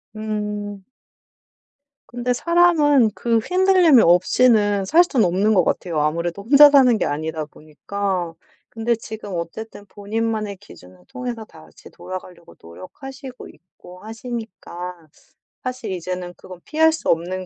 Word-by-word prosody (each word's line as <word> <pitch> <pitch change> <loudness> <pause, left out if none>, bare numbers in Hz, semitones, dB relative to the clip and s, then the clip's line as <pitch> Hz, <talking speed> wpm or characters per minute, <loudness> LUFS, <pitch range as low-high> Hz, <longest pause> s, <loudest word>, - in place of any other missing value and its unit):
음. 210 -2 -5 1.2
근데 245 +1 -2
사람은 300 -7 +3
그 230 +4 0
흔들림이 365 - +4
없이는 205 +3 +3
살 330 - +5
순 260 -10 +1
없는 195 +5 +2
것 185 -4 +4
같아요. 165 -3 -2
아무래도 170 +5 -2
혼자 285 +6 +8
사는 255 -5 +5
게 - - -1
아니다 155 +1 -3
보니까. 175 +4 -5 0.4
근데 230 +1 -1
지금 220 -3 -9
어쨌든 205 +5 -7
본인만의 215 0 -3
기준을 90 - -17
통해서 245 -3 -6
다시 80 - -17
돌아가려고 185 -2 -10
노력하시고 260 - -11
있고 180 0 -17
하시니까 210 -7 -8 0.6
사실 255 -4 -5
이제는 180 0 -5
그건 185 -1 -12
피할 320 +1 +3
수 320 - -4
없는 185 +3 -1
210 Hz, 290 characters per minute, -21 LUFS, 180-245 Hz, 1.2 s, 혼자